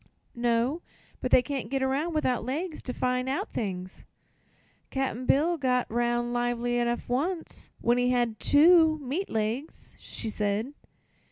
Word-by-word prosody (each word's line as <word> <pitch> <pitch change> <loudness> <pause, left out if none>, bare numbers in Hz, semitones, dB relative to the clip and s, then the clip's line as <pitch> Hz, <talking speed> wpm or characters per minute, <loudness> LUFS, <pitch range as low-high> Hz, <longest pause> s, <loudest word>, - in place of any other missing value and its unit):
"No; 240 +6 0 0.4
but 255 - -2
they 250 - +5
can't 270 -6 -4
get 270 0 0
around, 290 +5 0
without 255 -5 +1
legs, 305 +7 -3
to 250 - -4
find 250 +1 -1
out 275 - -3
things." 185 -4 -4 0.9
"Cap'n 260 -2 -2
Bill 330 +5 +3
got 250 -2 +1
'round 240 +1 0
lively 240 0 0
'nough 240 0 -2
once, 320 +8 -3
when 240 +1 +3
he 245 0 +2
had 240 -3 0
two 320 +1 +6
meat 300 +7 -3
legs," 225 +7 -3
she 220 - -4
said. 210 +6 -1
250 Hz, 145 wpm, -28 LUFS, 240-285 Hz, 0.9 s, two